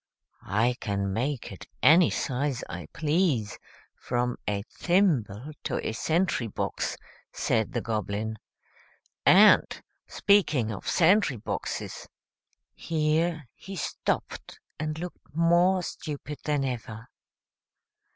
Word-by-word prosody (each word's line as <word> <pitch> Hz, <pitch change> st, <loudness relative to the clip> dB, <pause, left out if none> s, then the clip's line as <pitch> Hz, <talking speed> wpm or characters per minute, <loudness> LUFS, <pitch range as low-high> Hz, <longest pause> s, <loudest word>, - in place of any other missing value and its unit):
"I 120 Hz, +5 st, +1 dB
can 100 Hz, -1 st, -2 dB
make 125 Hz, +2 st, -2 dB
it 95 Hz, -, -10 dB, 0.2 s
any 165 Hz, +2 st, +7 dB
size 135 Hz, -1 st, -2 dB
I -, -, -7 dB
please, 150 Hz, -, 0 dB, 0.4 s
from 125 Hz, 0 st, -1 dB
a 100 Hz, -1 st, -1 dB
thimble 150 Hz, -, 0 dB
to -, -, -1 dB
a -, -, -1 dB
sentry 155 Hz, +1 st, 0 dB
box," 105 Hz, -, -3 dB, 0.3 s
said 110 Hz, -2 st, 0 dB
the 120 Hz, -, -1 dB
Goblin. 110 Hz, 0 st, -3 dB, 0.9 s
"And, -, -, +8 dB, 0.4 s
speaking 155 Hz, -, +2 dB
of 100 Hz, -, -7 dB
sentry 175 Hz, -, +4 dB
boxes" 105 Hz, -, -5 dB, 0.7 s
here 160 Hz, -1 st, 0 dB
he 195 Hz, -, -9 dB
stopped 170 Hz, -, -3 dB, 0.2 s
and 155 Hz, 0 st, -3 dB
looked 175 Hz, -3 st, -9 dB
more 175 Hz, +3 st, +4 dB
stupid 150 Hz, -3 st, -6 dB
than 145 Hz, -2 st, +1 dB
ever. 115 Hz, -2 st, -5 dB
140 Hz, 105 wpm, -27 LUFS, 110-165 Hz, 0.9 s, And